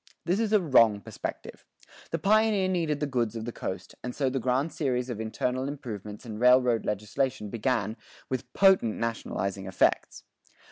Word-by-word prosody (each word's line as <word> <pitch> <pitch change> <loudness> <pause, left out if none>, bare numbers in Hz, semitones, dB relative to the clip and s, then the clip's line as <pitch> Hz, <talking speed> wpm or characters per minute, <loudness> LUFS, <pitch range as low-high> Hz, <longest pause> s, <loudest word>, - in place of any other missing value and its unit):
This 180 +4 +1
is 225 -2 0
a 215 - +5
wrong 115 - +4
perspective. - - -7 0.5
The 165 - -1
pioneer 210 +1 +3
needed 165 -5 0
the 150 - 0
goods 120 -5 -1
of 110 -1 -4
the 120 - -4
coast, 95 -4 -6
and 125 - -5
so 135 -3 0
the 135 - -1
grand 130 +6 0
series 125 -4 -1
of 110 -2 -4
internal 125 +4 -2
improvement 110 -7 -7
and 110 -2 -6
railroad 125 -1 +4
legislation 105 +1 -2
began, 115 -2 -1 0.3
with 130 -1 -4
potent 190 - +4
nationalizing 100 -4 -3
effects. 95 - +1
125 Hz, 160 wpm, -28 LUFS, 110-150 Hz, 0.5 s, a